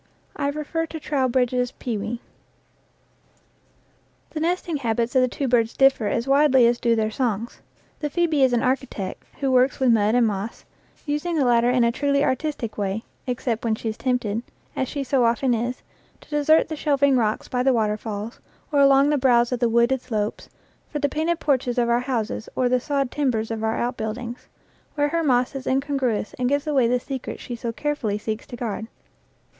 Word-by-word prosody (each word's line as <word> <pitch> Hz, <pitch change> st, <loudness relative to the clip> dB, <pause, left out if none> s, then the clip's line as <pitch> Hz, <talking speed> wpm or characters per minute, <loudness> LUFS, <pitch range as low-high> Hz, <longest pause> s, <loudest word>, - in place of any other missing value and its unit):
I 280 Hz, -, -1 dB
refer 305 Hz, +3 st, -2 dB
to 320 Hz, -, -7 dB
Trow 280 Hz, -3 st, 0 dB
bridge's 250 Hz, 0 st, 0 dB
"Pewee." 230 Hz, 0 st, -4 dB, 2.1 s
The 310 Hz, -, -4 dB
nesting 340 Hz, -1 st, -1 dB
habits 235 Hz, 0 st, -1 dB
of 260 Hz, -, +6 dB
the 255 Hz, -, +3 dB
two 270 Hz, +2 st, -3 dB
birds 235 Hz, -2 st, +1 dB
differ 270 Hz, -5 st, +4 dB
as 230 Hz, +4 st, -1 dB
widely 275 Hz, -2 st, +5 dB
as 235 Hz, 0 st, +2 dB
do 235 Hz, -1 st, +2 dB
their 220 Hz, -1 st, 0 dB
songs. 230 Hz, -1 st, -2 dB, 0.4 s
The 295 Hz, -, -2 dB
phoebe 320 Hz, -2 st, +1 dB
is 260 Hz, -1 st, +5 dB
an 240 Hz, -1 st, +1 dB
architect 250 Hz, -7 st, -2 dB, 0.2 s
tvho 270 Hz, -1 st, +1 dB
works 255 Hz, +1 st, +3 dB
with 260 Hz, -2 st, +4 dB
mud 215 Hz, 0 st, +3 dB
and 245 Hz, -1 st, +4 dB
moss, 210 Hz, +1 st, -4 dB, 0.4 s
using 300 Hz, +3 st, -1 dB
the 290 Hz, -4 st, +2 dB
latter 240 Hz, 0 st, +4 dB
in 250 Hz, -1 st, +3 dB
a 235 Hz, -, +3 dB
truly 280 Hz, +2 st, +1 dB
artistic 260 Hz, -6 st, -2 dB
way, 200 Hz, +2 st, -2 dB, 0.2 s
except 245 Hz, -2 st, -2 dB
when 225 Hz, -2 st, +1 dB
she 225 Hz, -, -4 dB
is 215 Hz, -, -5 dB
tempted, 240 Hz, -4 st, -1 dB, 0.3 s
as 260 Hz, -, -1 dB
she 280 Hz, +1 st, -3 dB
so 265 Hz, -1 st, +2 dB
often 240 Hz, +2 st, +2 dB
is, 240 Hz, +2 st, -2 dB, 0.4 s
to -, -, -20 dB
desert 295 Hz, +2 st, +4 dB
the 315 Hz, -, -3 dB
shelving 280 Hz, -2 st, +2 dB
rocks 220 Hz, -3 st, 0 dB
by 250 Hz, -, -1 dB
the 265 Hz, +1 st, +3 dB
waterfalls, 215 Hz, -1 st, -2 dB, 0.3 s
or 290 Hz, -, +2 dB
along 275 Hz, 0 st, +6 dB
the 295 Hz, -, +2 dB
brows 240 Hz, -2 st, +3 dB
of 250 Hz, -, -1 dB
the 240 Hz, -1 st, +2 dB
wooded 235 Hz, +3 st, +2 dB
slopes, 215 Hz, -4 st, -3 dB, 0.4 s
for 300 Hz, -, -4 dB
the 285 Hz, -1 st, 0 dB
painted 320 Hz, +4 st, -1 dB
porches 260 Hz, -5 st, 0 dB
of 240 Hz, -1 st, +2 dB
our 235 Hz, 0 st, +3 dB
houses 240 Hz, -4 st, -3 dB
or 255 Hz, -, +2 dB
the 250 Hz, 0 st, +2 dB
sawed 275 Hz, 0 st, -1 dB
timbers 235 Hz, -6 st, -1 dB
of 225 Hz, -1 st, -3 dB
our 220 Hz, 0 st, 0 dB
outbuildings, 240 Hz, 0 st, -4 dB, 0.5 s
where 290 Hz, -1 st, +1 dB
her 335 Hz, +2 st, 0 dB
moss 255 Hz, -4 st, +2 dB
is 270 Hz, -1 st, -6 dB
in 260 Hz, +1 st, +3 dB
congruous 270 Hz, -7 st, -1 dB
and 250 Hz, 0 st, +1 dB
gives 285 Hz, +1 st, 0 dB
away 275 Hz, -6 st, +2 dB
the 250 Hz, +1 st, +2 dB
secret 265 Hz, 0 st, -6 dB
she 245 Hz, -, -6 dB
so 235 Hz, 0 st, -4 dB
care 295 Hz, +6 st, -1 dB
fully 215 Hz, -8 st, -2 dB
seeks 215 Hz, +1 st, -5 dB
to 250 Hz, -, -8 dB
guard. 225 Hz, -2 st, -4 dB
250 Hz, 195 wpm, -23 LUFS, 230-280 Hz, 2.1 s, of